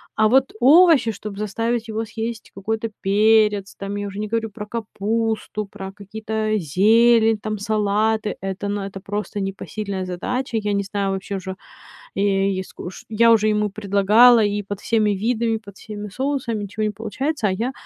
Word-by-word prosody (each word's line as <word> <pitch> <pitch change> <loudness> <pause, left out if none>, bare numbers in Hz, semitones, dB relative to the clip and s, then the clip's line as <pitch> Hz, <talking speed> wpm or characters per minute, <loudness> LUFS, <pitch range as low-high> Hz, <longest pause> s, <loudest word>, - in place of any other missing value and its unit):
А 215 0 +4
вот 265 +3 +3
овощи, 285 -3 +6
чтоб 205 -1 -8
заставить 230 +3 -2
его 220 +1 -3
съесть 225 +1 -6
какой-то 220 +3 -3
перец, 210 0 +3
там, 200 +1 -5
я 205 0 -3
уже 200 +1 -7
не 215 - -2
говорю 225 0 -2
про 210 0 -8
капусту, 220 -1 -2
про 195 0 -8
какие-то 215 +2 -4
зелень, 220 +6 +4
там, 215 0 -3
салаты- 215 0 0
это, 195 +1 -4
ну, 205 0 -2
это 195 0 -6
просто 205 +1 -4
непосильная 195 0 -4
задача. 230 +7 -3
Я 210 -1 -1
не 200 0 0
знаю 195 0 -2
вообще 195 +1 -4
уже, 190 0 -6 0.6
е 195 0 +1
и 190 - -2
скуш 180 0 -10
я 230 +1 +5
уже 215 -1 +4
ему 210 -1 +1
предлагала 210 +4 +5
и 205 0 -1
под 200 0 -6
всеми 215 -3 +1
видами, 225 +2 0
под 200 -3 -11
всеми 210 -1 -7
соусами- 250 -2 -2
ничего 210 +2 -5
не 210 - +1
получается, 225 +4 -2
а - - 0
я 235 +7 -2
210 Hz, 170 wpm, -22 LUFS, 200-225 Hz, 0.6 s, овощи